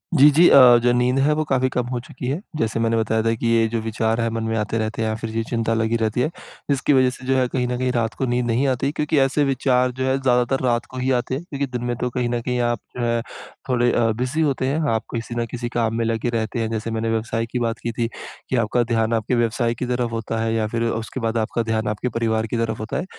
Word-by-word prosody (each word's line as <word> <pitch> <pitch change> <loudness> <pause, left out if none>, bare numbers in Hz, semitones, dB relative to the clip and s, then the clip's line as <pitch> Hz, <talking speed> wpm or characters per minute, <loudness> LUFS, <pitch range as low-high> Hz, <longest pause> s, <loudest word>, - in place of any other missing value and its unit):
जी, 145 0 +8
जी, 170 +5 +6
अ, 125 -3 +8
जो 120 - +4
नींद 125 +1 +2
है 145 +3 +3
वो 155 - 0
काफ़ी 130 -2 +1
कम 125 -1 -1
हो 125 - -1
चुकी 125 +1 -8
है। 140 +5 -1 0.2
जैसे 115 -5 -1
मैंने 115 0 +1
बताया 110 0 +1
था 115 0 +2
कि 115 - -2
ये 115 -1 +3
जो 115 0 -1
विचार 110 +1 -1
हैं, 115 - +1
मन 115 -1 -2
में 110 0 -1
आते 105 +1 -1
रहते 110 0 -2
हैं, 110 - 0
या 110 - -1
फिर 115 0 -5
ये 115 - +1
चिंता 115 -1 0
लगी 115 0 +1
रहती 110 +2 0
है। 125 - +2 0.4
जिसकी 140 +1 +2
वज़ह 130 -1 +4
से 130 0 -10
जो 135 - +2
है, 130 - +2
कहीं 125 0 -1
न 125 0 -2
कहीं 130 0 0
रात 115 -2 -1
को 130 - +1
नींद 125 0 0
नहीं 120 +4 +1
आती, 135 +1 0
क्योंकि 150 +1 -1
ऐसे 135 +2 +2
विचार 130 -2 +2
जो 130 +1 -3
हैं, 130 0 +2
ज़्यादातर 125 0 +2
रात 120 -1 +1
को 130 - -8
ही 130 +1 0
आते 125 +2 -2
हैं। 150 - -5
क्योंकि 140 -5 -3
दिन 120 - -6
में 120 - -1
तो 125 - 0
कहीं 120 0 -1
न 120 0 -1
कहीं 125 +1 -2
आप 120 0 0 0.2
जो - - -2
है, 115 0 +1 0.5
थोड़े 120 -1 +2
अ, 115 -1 +2
बिज़ी 130 +6 0
होते 140 -4 +1
हैं, 140 +4 0
आप 110 - 0
किसी 115 +1 -4
न - - -1
किसी 120 -1 -4
काम 115 -1 -1
में 115 0 0
लगे 115 +1 -1
रहते 110 +2 -2
हैं। 110 -1 -1
जैसे 115 0 -3
मैंने 115 0 -1
व्यवसाय 115 0 -1
की 125 - -1
बात 115 -1 -1
की 120 - -1
थी, 115 0 -1 0.4
कि - - 0
आपका 120 +1 +2
ध्यान 115 0 +1
आपके 115 +2 0
व्यवसाय 115 0 +1
की - - -1
तरफ 125 -1 -1
होता 115 0 -3
है 115 0 0
या 110 -1 0
फिर 115 +2 -2
उसके 115 +3 -4
बाद 115 -1 -1
आपका 115 +1 -1
ध्यान 110 -1 -1
आपके 105 +4 -2
परिवार 110 -1 0
की 120 - -2
तरफ 115 -1 -1
होता 110 +1 -3
है। 175 - -2
120 Hz, 280 wpm, -22 LUFS, 115-130 Hz, 0.5 s, जी